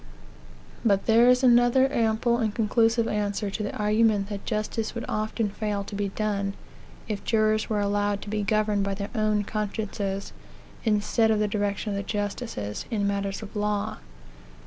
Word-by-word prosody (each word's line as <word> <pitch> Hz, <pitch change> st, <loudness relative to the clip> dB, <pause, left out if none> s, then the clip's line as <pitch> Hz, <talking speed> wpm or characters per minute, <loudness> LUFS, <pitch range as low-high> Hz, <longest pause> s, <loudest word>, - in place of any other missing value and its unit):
But 200 Hz, -3 st, +2 dB
there 230 Hz, +2 st, +6 dB
is 250 Hz, +1 st, +4 dB
another 245 Hz, +1 st, +5 dB
ample 230 Hz, +1 st, +2 dB
and 220 Hz, -3 st, -1 dB
conclusive 230 Hz, +1 st, +2 dB
answer 205 Hz, -1 st, -1 dB
to 215 Hz, -, -4 dB
the 205 Hz, -, -3 dB
argument 210 Hz, -1 st, +2 dB
that 200 Hz, -2 st, -6 dB
justice 215 Hz, +1 st, -2 dB
would 235 Hz, -, -4 dB
often 215 Hz, 0 st, -1 dB
fail 205 Hz, -1 st, -2 dB
to 205 Hz, -, -10 dB
be 200 Hz, 0 st, -1 dB
done, 200 Hz, -1 st, -1 dB, 0.5 s
if 210 Hz, -2 st, -4 dB
jurors 215 Hz, -1 st, +2 dB
were 210 Hz, -2 st, +1 dB
allowed 205 Hz, 0 st, 0 dB
to -, -, -8 dB
be 210 Hz, 0 st, -1 dB
governed 210 Hz, -1 st, +1 dB
by 195 Hz, 0 st, -1 dB
their 200 Hz, +1 st, -5 dB
own 215 Hz, -2 st, +1 dB
consciences, 200 Hz, -2 st, -3 dB, 0.5 s
instead 220 Hz, +1 st, +2 dB
of 220 Hz, -, +3 dB
the 210 Hz, 0 st, +1 dB
direction 205 Hz, +1 st, -1 dB
of -, -, -2 dB
the -, -, -1 dB
justices, 205 Hz, -, -4 dB
in 210 Hz, -4 st, 0 dB
matters 200 Hz, +1 st, -2 dB
of 215 Hz, +1 st, -10 dB
law. 210 Hz, -, -1 dB
210 Hz, 170 wpm, -26 LUFS, 200-220 Hz, 0.5 s, there